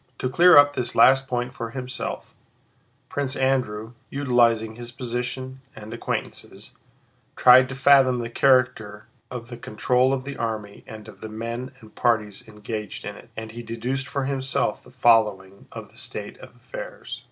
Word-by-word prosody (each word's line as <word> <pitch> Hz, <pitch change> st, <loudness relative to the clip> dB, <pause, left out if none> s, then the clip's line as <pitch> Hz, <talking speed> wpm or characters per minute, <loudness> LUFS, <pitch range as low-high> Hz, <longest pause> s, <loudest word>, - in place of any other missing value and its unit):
To 130 Hz, -, -2 dB
clear 175 Hz, +6 st, +7 dB
up 145 Hz, 0 st, +7 dB
this 125 Hz, -, -3 dB
last 135 Hz, 0 st, +5 dB
point 125 Hz, 0 st, -2 dB
for 115 Hz, -2 st, -5 dB
himself, 130 Hz, +1 st, -6 dB, 0.7 s
Prince 140 Hz, -1 st, -3 dB
Andrew, 125 Hz, -5 st, -1 dB, 0.2 s
utilizing 120 Hz, -5 st, +2 dB
his 120 Hz, 0 st, -8 dB
position 130 Hz, +1 st, -5 dB
and 110 Hz, -1 st, -9 dB
acquaintances, 120 Hz, -, -5 dB, 0.6 s
tried 130 Hz, +1 st, +7 dB
to 130 Hz, -, -6 dB
fathom 135 Hz, -1 st, +5 dB
the 120 Hz, -1 st, -3 dB
character 120 Hz, -5 st, +1 dB, 0.2 s
of 120 Hz, -2 st, -7 dB
the 120 Hz, -, -8 dB
control 125 Hz, +4 st, +1 dB
of 135 Hz, -1 st, -1 dB
the 140 Hz, +1 st, -7 dB
army 110 Hz, -3 st, -4 dB
and 110 Hz, 0 st, -10 dB
of 100 Hz, -3 st, -14 dB
the 110 Hz, -, -7 dB
men 115 Hz, +4 st, -5 dB
and 110 Hz, -1 st, -16 dB
parties 110 Hz, -4 st, 0 dB
engaged 105 Hz, -1 st, -6 dB
in -, -, -6 dB
it, -, -, -15 dB
and 110 Hz, 0 st, -6 dB
he 120 Hz, +1 st, -8 dB
deduced 125 Hz, +4 st, -4 dB
for 135 Hz, +1 st, -2 dB
himself 135 Hz, -5 st, -1 dB
the -, -, -18 dB
following 105 Hz, -6 st, +2 dB
of -, -, -9 dB
the -, -, -20 dB
state -, -, -7 dB
of -, -, -13 dB
affairs. -, -, -8 dB
120 Hz, 165 wpm, -24 LUFS, 110-130 Hz, 0.7 s, clear